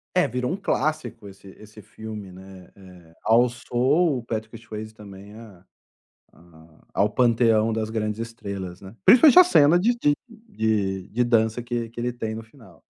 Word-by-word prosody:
É, 180 - +3
virou 125 +4 -3
um - - -1
clássico 150 - -3
esse 100 0 -15
esse 105 0 -14
filme, 105 -1 -9
né. 95 0 -14
É, 90 -4 -17
alçou 125 +6 +2
o - - -11
Patrick 110 0 -5
Swayze 110 -1 -9
também 100 -1 -13
a 105 -5 -14 0.7
a 80 -1 -21
ao 105 +1 +2
panteão 115 -2 +2
das 110 0 -3
grandes 110 0 -3
estrelas, 100 -6 -7
né. 95 +4 -13
Principalmente 290 +7 +7
a 365 - +10
cena 160 - +4
de 235 +6 +2
de 145 - +3
de 110 - -3
de 120 +3 0
dança 115 0 +1
que 120 -1 -4
que 120 - -8
ele 125 +1 -1
tem 110 -2 -5
no 115 - -7
final. 110 - -19
110 Hz, 165 wpm, -23 LUFS, 100-125 Hz, 0.7 s, a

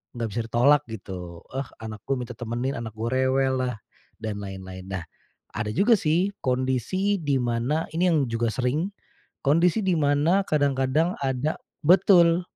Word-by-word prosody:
enggak 115 -2 -2
bisa 115 +3 -1
ditolak 140 +5 +5
gitu. 90 -6 -8
"Eee, 135 0 -3 0.2
anak 110 -1 -6
gue 135 - +1
minta 125 -1 -5
temenin, 120 +3 -3
anak 110 -2 -7
gue 115 +2 -2
rewellah," 130 -1 +1 0.5
dan 105 -2 -3
lain-lain. 95 -2 -8
Nah, 95 -3 -4 0.5
ada 110 0 -2
juga 220 +4 +5
sih 175 +5 +1
kondisi 130 - 0
di 145 -3 +1
mana, 120 +7 0
ini 175 +3 +2
yang 150 -4 +2
juga 115 0 0
sering, 140 +9 0 0.6
kondisi 170 +8 +3
dimana 160 +2 +3
kadang-kadang 145 +3 +2
ada 135 +2 -1 0.3
betul. 175 -1 +6
130 Hz, 145 wpm, -25 LUFS, 115-160 Hz, 0.6 s, betul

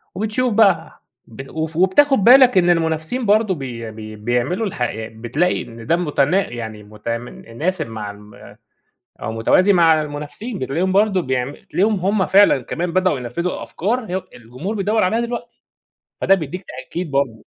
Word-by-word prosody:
وبتشوف 220 +4 -1
بقى 195 -7 +2 0.2
ب 135 +4 -10
وف 160 0 -4
وبتاخد 270 +10 +4
بالك 250 -2 +7
إن 175 -1 +4
المنافسين 165 +8 0
برضو 210 -2 +3
بي 120 -5 -6
بي 110 0 -9
بيعملوا 120 - -1
الح 150 - -8
يع 110 -2 -2
بتلاقي 120 +11 -1
إن 115 -1 -11
ده 170 - +3
متنا 170 +2 +1
يعني 110 -3 -7
متناسب 115 - -4
مع 105 -2 -6
ال 105 0 -15 0.7
أو - - -3
متوازي 185 - +3
مع 165 -3 +4
المنافسين، 150 +10 -6
بتلاقيهم 165 +9 -1
برضو 200 -1 +3
بيعم 130 -1 -2
بتلاقيهم 205 +8 -1
هم 195 +1 +1
فعلًا 195 -9 +5
كمان 170 +7 -4
بدؤوا 185 -7 +2
ينفذوا 150 +9 -3
أفكار 225 +6 -2
هي 185 +1 -2
الجمهور 125 - -6
بيدور 210 +2 +1
عليها 220 +6 +1
دلوقتي، 235 0 -4 0.7
فده 195 - +5
بيدّيك 180 +2 -6
تأكيد 175 -3 -6
برضو. 130 -6 -1
165 Hz, 155 wpm, -20 LUFS, 120-195 Hz, 0.7 s, بالك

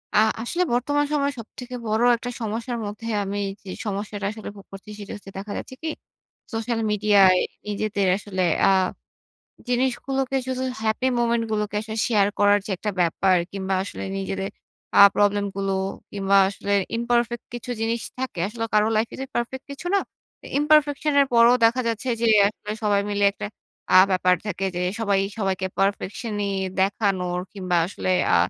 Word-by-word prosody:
আ - - +6 0.2
আসলে 345 +10 0
বর্তমান 290 +4 +1
সময়ে 285 -1 +1
সবথেকে 250 +2 -8
বড় 215 +1 +1 0.2
একটা 245 +1 -6
সমস্যার 230 +2 -3
মধ্যে 210 +2 -6 0.2
আমি 200 +1 -3 0.2
যে, 195 - -10 0.2
সমস্যাটা 205 0 -4
আসলে 220 0 -8
ভোগ 200 - -13
করছি 195 +2 -11
সেটা 205 - -8
হচ্ছে 200 -1 -11
দেখা 200 +2 -6
যাচ্ছে 260 - -7
কি, 320 - -1 0.6
সোশ্যাল 225 +1 -1
মিডিয়ায় 200 -3 +5 0.3
নিজেদের 205 -1 -1
আসলে 190 -3 -3 0.2
আ - - +6 1.0
জিনিসগুলোকে 265 +2 0
শুধু 260 0 -2 0.2
happy 220 +3 0
moment 235 -1 +2
গুলোকে 210 -1 -1
আসলে 220 0 -6
শেয়ার 210 -4 +3
করার 205 0 +5
যে, - - -6
একটা 210 - -3
ব্যাপার, 180 +2 +3 0.2
কিংবা 195 -1 -2
আসলে 200 - -6
নিজেদের 195 0 -3 0.5
আ - - +11
প্রবলেম 205 0 +3
গুলো 195 0 -1 0.4
কিংবা 200 0 +2
আসলে 200 0 -4 0.2
imperfect 235 0 0
কিছু 240 +1 -6
জিনিস 230 +1 0 0.2
থাকে। 260 -7 -4
আসলে 225 +1 -4
কারো 210 0 +4
লাইফ 220 +1 +1
এ - - -6
যে, 270 - -3
perfect 250 +2 -3
কিছু 280 +5 -8
না। 400 - +4 0.6
imperfection 300 0 +3
এর 280 - +4
পরেও 235 +1 +6
দেখা 235 +3 +4
যাচ্ছে 230 +3 -3
যে, - - +3 0.2
একটা 210 0 -9
সবাই 205 -1 +3
মিলে 205 0 +1
একটা 205 - -6 0.5
আ - - +10
ব্যাপার 185 -1 +3
থাকে 195 -1 -3
যে, - - -1 0.2
সবাই, 200 -3 +2 0.2
সবাইকে 190 -2 -1
perfection 200 +3 -1 0.2
ই - - -1 0.3
দেখানোর 190 -3 0
কিংবা 185 -3 -1
আসলে 185 0 -2 0.2
আ - - +6
210 Hz, 165 wpm, -24 LUFS, 195-240 Hz, 1.0 s, আ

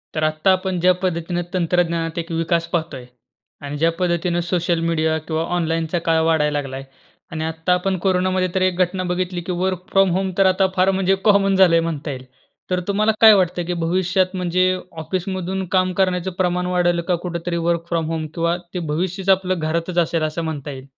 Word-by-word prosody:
तर 155 - -1
आत्ता 155 +4 +2
आपण 185 -1 -2
ज्या 180 +2 +4
पद्धतीने 175 -1 -1
तंत्रज्ञानात 170 -2 0
एक 170 +1 -6
विकास 165 +1 0
पाहतोय 160 -7 -3 0.6
आणि 145 +1 -5
ज्या 165 +3 +2
पद्धतीने 175 -1 0
सोशल 175 -1 0
मीडिया 160 -1 +1
किंवा 160 0 -1
ऑनलाईनचा 165 0 -1
काळ 165 0 +3
वाढायला 155 -2 +2
लागलाय 135 -1 -6 0.5
आणि 160 -1 -3
आत्ता 160 +2 0
आपण 185 +1 0
कोरोनामध्ये 185 0 +1
तर 190 - +1
एक 185 -1 +1
घटना 185 +1 0
बघितली, 180 0 -2
की 175 - -5
वर्क 180 0 -2
फ्रॉम 195 -1 +4
होम 190 0 -1
तर 195 - +4
आता 190 +1 +3
फार 190 +1 +3
म्हणजे 190 0 +2
कॉमन 200 -2 +4
झालंय 180 -3 +5
म्हणता 160 -3 -3
येईल. 130 -1 -8 0.4
तर 180 - +1
तुम्हाला 210 +2 +2
काय 220 -1 +10
वाटतंय, 180 -3 +1
की 180 - -2
भविष्यात 185 +2 0
म्हणजे 185 +1 +1 0.3
ऑफिसमधून 185 +2 -3
काम 185 0 +1
करण्याचं 185 0 0
प्रमाण 180 -1 0
वाढल 175 -1 +2
का? 180 - +2
कुठेतरी 170 0 -4
वर्क 170 -1 +1
फ्रॉम 165 -2 0
होम 160 -1 -3
किंवा 170 0 0 0.2
ते 180 - -2
भविष्यच 185 +4 -2
आपलं 185 -1 +2
घरातच 165 +3 -2
असेल 165 -1 +1
असं 155 +2 -2
म्हणता 150 -3 -4
येईल? 130 -1 -9
175 Hz, 185 wpm, -20 LUFS, 165-185 Hz, 0.6 s, काय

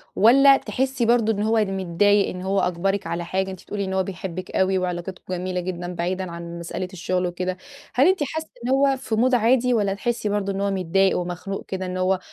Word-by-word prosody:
والّا 275 +6 +7
تحسي 265 -2 -1
برضه 230 -1 +3
إن 205 - -3
هو 225 +1 +2
متضايق 195 +1 +2
إن 180 - -6
هو 195 +1 0
أجبرِك 185 +1 0
على 170 +1 -3
حاجة، 190 +2 -1
أنتِ 185 - -10
بتقول 210 - -6
لي 200 - 0
إن 190 - -4
هو 190 - +2
بيحبِك 185 -1 -6
أوي 190 0 +2
وعلاقاتكم 180 0 -4
جميلة 180 0 -2
جدًا 180 0 -4
بعيدًا 180 +1 -2
عن 170 0 -7
مسألة 175 +2 -4
الشغل 180 +1 -1
وكده، 180 +1 -3 0.4
هل 270 +5 +4
أنتِ 370 -4 +3
حاسة 315 +3 -4 0.2
إن - - -1
هو 270 0 +3
في 255 -4 -3
مود 250 +3 +3
عادي، 245 +2 +3
والّا 205 -4 +1
تحسي 230 +1 -2
برضه 200 -1 -1
إن 195 0 -3
هو 200 0 +1
متضايق 190 +1 +2
ومخنوق 180 +3 -4
كده 190 -1 -4
إن 185 0 -4
هو 185 0 +1
190 Hz, 215 wpm, -23 LUFS, 180-225 Hz, 0.4 s, والّا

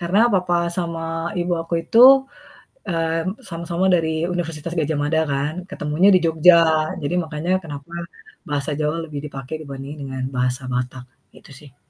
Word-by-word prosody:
Karena 175 +3 +1 0.2
papa 180 -1 +1 0.2
sama 170 -2 -3 0.4
ibu 175 0 -1
aku 165 +1 -9
itu, 225 +7 0 0.9
mmm, 165 +3 -1
sama-sama 170 +1 -3
dari 165 -2 +1 0.3
Universitas 165 -2 -4
Gadjah 155 -1 0
Mada 160 +2 +1
kan, 140 +2 -1 0.2
ketemunya 170 0 +1
di - - +7
Jogja. 165 +2 +6 0.5
Jadi 145 +4 -2
makanya 160 +2 -4
kenapa, 145 +1 -9 0.6
bahasa 145 0 -2
Jawa 150 +1 0
lebih 150 -3 -6
dipakai 135 0 -7
dibanding 140 0 -8
dengan 130 -1 -5
bahasa 125 +1 0
Batak, 125 0 -3 0.3
itu - - -18
sih. 140 -3 -17
160 Hz, 145 wpm, -21 LUFS, 140-170 Hz, 0.9 s, di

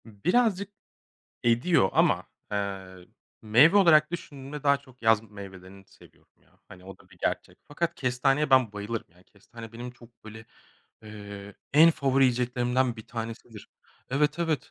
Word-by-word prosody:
Birazcık 190 - 0 0.7
ediyor 120 - +3
ama, - - +2 0.3
eee, 95 -3 -5 0.4
meyve 125 - +5
olarak 155 -6 +5
düşündüğümde 145 -4 -8
daha 140 -1 +4
çok 130 -3 -20
yaz 110 -1 +4
meyvelerini 95 -1 -12
seviyorum - - -22
ya, - - -31
hani, 90 0 -14
o 95 0 -11
da 95 - -22
bir 90 -2 -20
gerçek. - - -3
Fakat 170 +3 -2
kestaneye 135 +3 0
ben 130 -5 +4
bayılırım. 105 +2 -5
Yani, 90 +2 -24
kestane 115 +2 -13
benim 120 +2 -7
çok 120 -1 -20
böyle, 110 +1 -11 0.6
eee, 100 -2 -10 0.2
en 160 +3 +7
favori 135 -3 +2
yiyeceklerimden 125 0 0
bir 110 - -11
tanesidir. 115 -1 -8 0.4
Evet, 150 +4 +1
evet. 165 -3 -2
120 Hz, 145 wpm, -27 LUFS, 105-140 Hz, 0.7 s, en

